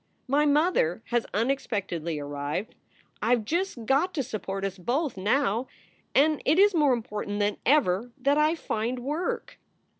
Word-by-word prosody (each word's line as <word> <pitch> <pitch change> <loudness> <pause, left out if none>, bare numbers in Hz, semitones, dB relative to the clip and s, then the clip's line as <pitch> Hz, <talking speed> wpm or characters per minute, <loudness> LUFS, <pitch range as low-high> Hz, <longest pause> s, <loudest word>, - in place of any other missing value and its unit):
My 290 +3 +3
mother 290 - +2
has 240 -1 0
unexpectedly 200 - -1
arrived. 145 - -4 0.5
I 230 +3 +4
ve 230 - -4
just 325 - -2
got 305 - +2
to 280 - 0
support 195 -3 -4
us 195 -1 -4
both 260 - -1
now, 225 +4 +1 0.5
and 300 +2 +4
it 305 +4 +3
is 405 +1 +6
more 300 -5 +4
important 210 -3 -3
than 205 0 +1
ever 240 -6 +3
that 280 +2 +2
I 305 +2 +3
find 235 -5 -2
work." 295 +8 -3
245 Hz, 150 wpm, -27 LUFS, 205-295 Hz, 0.5 s, is